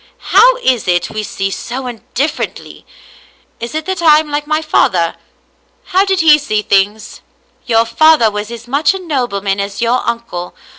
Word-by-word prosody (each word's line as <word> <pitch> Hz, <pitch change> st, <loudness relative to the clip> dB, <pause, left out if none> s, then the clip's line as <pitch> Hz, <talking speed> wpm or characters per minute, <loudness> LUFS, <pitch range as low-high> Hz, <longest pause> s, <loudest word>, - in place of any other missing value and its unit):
How 480 Hz, +6 st, +6 dB
is 250 Hz, -6 st, +1 dB
it 175 Hz, -1 st, 0 dB
we 215 Hz, -, -3 dB
see 195 Hz, -2 st, -4 dB
so 255 Hz, +5 st, -5 dB, 0.3 s
differ 290 Hz, +4 st, 0 dB
ently? -, -, -14 dB, 0.7 s
Is 235 Hz, +5 st, -6 dB
it 315 Hz, 0 st, -3 dB
that 375 Hz, -1 st, -3 dB
I 310 Hz, -3 st, +6 dB
am 305 Hz, -1 st, -2 dB
like 295 Hz, 0 st, -2 dB
my 310 Hz, 0 st, +1 dB
father? 175 Hz, -, +1 dB, 0.7 s
How 380 Hz, +2 st, +1 dB
did 385 Hz, -2 st, +1 dB
he 305 Hz, -2 st, +6 dB
see 215 Hz, -7 st, -2 dB
things? 205 Hz, +2 st, 0 dB
" -, -, -41 dB
" -, -, -40 dB
Your 225 Hz, -1 st, +3 dB
father 230 Hz, 0 st, +4 dB
was 210 Hz, +1 st, -5 dB
as 235 Hz, 0 st, -9 dB
much 285 Hz, +8 st, +1 dB
a -, -, -5 dB
nobleman 240 Hz, -, -2 dB
as 200 Hz, 0 st, -4 dB
your 240 Hz, +2 st, +1 dB
uncle. 235 Hz, -7 st, -5 dB
240 Hz, 185 wpm, -14 LUFS, 210-310 Hz, 0.7 s, How